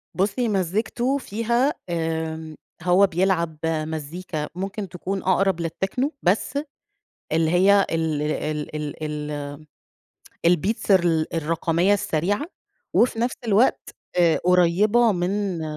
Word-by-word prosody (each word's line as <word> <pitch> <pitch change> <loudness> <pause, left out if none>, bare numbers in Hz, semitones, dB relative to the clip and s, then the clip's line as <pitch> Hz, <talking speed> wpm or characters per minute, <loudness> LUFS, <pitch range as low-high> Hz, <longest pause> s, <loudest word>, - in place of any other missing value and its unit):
بُصّي، 205 +6 0
مزّيكته 215 +8 0
فيها 235 +4 0 0.2
آآ، 160 -1 -3 0.3
هو 185 +2 +5
بيلعب 170 -3 0
مزّيكا 155 0 -3
ممكن 195 +1 -4
تكون 190 +2 -4
أقرَب 190 -1 +2
للtechno 220 - -2
بس 210 +9 +1 0.7
اللي 160 0 +2
هي 195 +2 +5
ال 160 -2 0
ال 150 0 -3
ال 150 +1 -5
ال 150 -1 -4 1.0
الbeats 200 +5 -1
الر 170 -4 +4
الرقمية 165 +4 +1
السريعة 200 - -1 0.5
وفي 235 -1 +3
نفس 240 +2 0
الوقت 220 +5 +2 0.3
آآ، 170 -2 +4
قريّبة 200 +6 +4
من 185 -1 -1
180 Hz, 105 wpm, -23 LUFS, 160-200 Hz, 1.0 s, هو